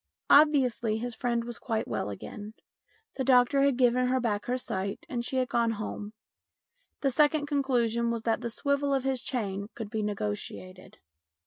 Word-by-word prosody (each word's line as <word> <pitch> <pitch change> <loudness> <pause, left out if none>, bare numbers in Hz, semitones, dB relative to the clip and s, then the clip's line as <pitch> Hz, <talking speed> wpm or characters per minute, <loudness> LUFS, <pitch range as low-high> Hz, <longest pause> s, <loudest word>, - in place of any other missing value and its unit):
Obviously 260 -7 +4
his 240 +2 -4
friend 235 +1 -1
was 240 0 -7
quite 225 -3 -2
well - - -2
again. 205 - -8 0.6
The 265 - 0
doctor 255 +2 +4
had 275 -2 +3
given 250 0 +3
her 260 +1 +2
back 210 -4 -1
her 250 +1 0
sight, 195 -5 -4
and 240 -1 -3
she 260 - -3
had 255 -1 +1
gone 235 -2 +1
home. 210 -1 -6 0.9
The 275 - +2
second 300 +2 +3
conclusion 245 -5 +1
was 230 -1 -2
that 225 0 0
the 235 - -3
swivel 280 +3 0
of 265 - -1
his 265 -2 -1
chain 200 -7 -3
could 220 -3 -6
be 220 - -1
negotiated. 185 - -5
240 Hz, 175 wpm, -29 LUFS, 215-265 Hz, 0.9 s, Obviously